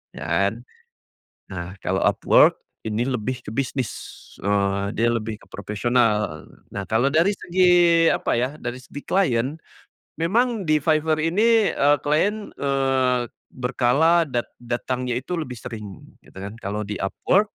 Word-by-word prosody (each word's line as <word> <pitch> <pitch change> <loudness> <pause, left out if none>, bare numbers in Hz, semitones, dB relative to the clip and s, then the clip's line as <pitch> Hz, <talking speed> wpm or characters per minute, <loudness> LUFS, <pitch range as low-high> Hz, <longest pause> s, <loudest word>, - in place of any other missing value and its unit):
dan - - -1 0.9
nah 90 0 -6
kalau 95 +1 0
Upwork - - +4 0.2
ini 110 +1 -1
lebih 125 -1 -3
ke - - -8
bisnis, 130 -2 -2 0.5
eee, 100 0 0
dia 115 +2 +2
lebih 110 -1 -3
ke - - -18
profesional. 105 -5 0 0.2
Nah 100 -1 -5
kalau 115 +7 +2
dari 170 +7 +3
segi, 175 -2 +4
apa - - 0
ya, 130 +4 -1
dari 120 +1 -4
segi 140 +3 -10
klien 145 -6 0 0.6
memang 220 +4 +1
di 155 -2 +3
Fiverr 155 0 +1
ini, 215 +6 +3
eee, 145 +1 +3
klien, 200 +9 0
eee, 135 -3 +1 0.2
berkala 135 +7 +2
dat 120 -3 -3
datangnya 125 +1 -3
itu 175 +6 -4
lebih 130 -6 -4
sering 105 -5 -8 0.2
gitu - - -19
kan. 100 +4 -7
Kalau 105 0 -4
di 105 0 -5
Upwork 190 - +1
130 Hz, 135 wpm, -23 LUFS, 110-160 Hz, 0.9 s, Upwork